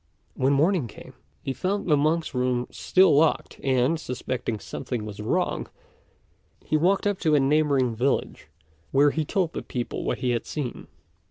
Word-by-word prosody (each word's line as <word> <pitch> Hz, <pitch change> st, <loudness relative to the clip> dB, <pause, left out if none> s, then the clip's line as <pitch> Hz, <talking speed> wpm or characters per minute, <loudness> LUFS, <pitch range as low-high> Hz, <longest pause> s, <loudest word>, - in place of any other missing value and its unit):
When 135 Hz, +2 st, +1 dB
morning 155 Hz, 0 st, +2 dB
came, 105 Hz, -, -12 dB, 0.3 s
he 135 Hz, -, -2 dB
found 200 Hz, +7 st, -2 dB
the 155 Hz, -, +5 dB
monk's 155 Hz, +3 st, +1 dB
room 125 Hz, -1 st, 0 dB
still 185 Hz, -4 st, +4 dB
locked; 155 Hz, +2 st, +2 dB
and, 135 Hz, +4 st, +2 dB
suspecting 125 Hz, -5 st, -4 dB
something 115 Hz, 0 st, -5 dB
was 105 Hz, -1 st, -8 dB
wrong, 170 Hz, +13 st, -1 dB, 1.0 s
he -, -, 0 dB
walked 180 Hz, +6 st, +3 dB, 0.2 s
to 155 Hz, -4 st, +3 dB
a -, -, +5 dB
neighbouring 140 Hz, -3 st, +2 dB
village, 130 Hz, +5 st, -1 dB, 0.4 s
where 145 Hz, +1 st, +5 dB
he 160 Hz, -, -1 dB
told 175 Hz, +1 st, -1 dB
the -, -, -4 dB
people 120 Hz, -2 st, -4 dB
what -, -, -1 dB
he 125 Hz, -, 0 dB
had 120 Hz, -2 st, -2 dB
seen. 140 Hz, -6 st, -5 dB
140 Hz, 160 wpm, -25 LUFS, 125-160 Hz, 1.0 s, the